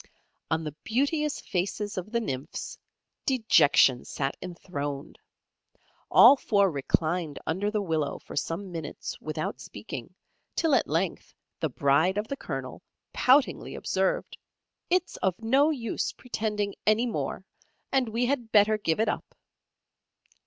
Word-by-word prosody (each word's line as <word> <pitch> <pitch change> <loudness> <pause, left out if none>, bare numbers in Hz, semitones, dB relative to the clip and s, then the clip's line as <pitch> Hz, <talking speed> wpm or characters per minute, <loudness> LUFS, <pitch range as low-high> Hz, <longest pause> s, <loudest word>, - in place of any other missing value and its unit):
On 160 0 0
the 150 -2 -5
beauteous 285 +5 0
faces 200 +3 -2
of 185 +2 -5
the 235 - +1
Nymphs, 135 - -5 0.5
dejection 160 - +4
sat 135 0 -3
enthroned. 145 -5 -6 0.9
All - - +9
four 200 -7 +2
reclined 155 +2 0
under 190 +6 0
the 210 -1 -1
willow 160 -5 -1
for - - -11
some 185 +3 -3
minutes 165 -3 -5
without - - -4
speaking, - - -8 0.4
till 325 -3 +2
at 265 - +3
length 165 +4 -2 0.2
the 160 - 0
bride 145 +8 +2
of 210 +1 -1
the 275 - -2
Colonel - - -6 0.3
poutingly 265 +2 +3
observed, - - -1 0.5
"It's 360 -1 +1
of 185 -2 0
no 265 +7 +3
use 240 -8 -2
pretending 210 -4 -2
any 215 +3 +4
more, 235 - -3 0.5
and 260 -4 +2
we 230 +3 0
had 245 -4 -1
better 215 0 +5
give 165 -4 0
it 220 - +2
up." - - -3
205 Hz, 130 wpm, -27 LUFS, 160-240 Hz, 0.9 s, All